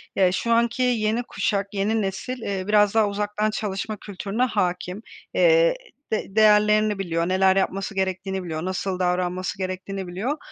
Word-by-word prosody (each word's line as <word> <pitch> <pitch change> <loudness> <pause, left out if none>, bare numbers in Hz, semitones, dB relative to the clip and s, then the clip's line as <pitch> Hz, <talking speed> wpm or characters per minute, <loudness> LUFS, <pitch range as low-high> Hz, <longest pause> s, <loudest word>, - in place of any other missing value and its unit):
Ya, 185 -2 +4
şu 235 +5 -1
anki 235 +2 +2
yeni 230 -1 +1
kuşak 200 -3 -1
yeni 210 +3 0
nesil, 205 +6 -4
eee, 195 -3 -3
biraz 210 -1 +4
daha 220 -2 +4
uzaktan 210 +1 -1
çalışma 210 0 -3
kültürüne 205 +4 -3
hâkim, 185 -4 -1 0.3
eee, - - +4 0.4
de 215 -2 -3
değerlerini 210 -1 +4
biliyor, 170 -2 -1
neler 190 0 +4
yapması 195 +1 -1
gerektiğini 190 0 -2
biliyor, 160 -1 -4
nasıl 185 0 -2
davranması 180 +1 -1
gerektiğini 185 0 -4
biliyor 220 - -3
200 Hz, 150 wpm, -24 LUFS, 185-215 Hz, 0.4 s, Ya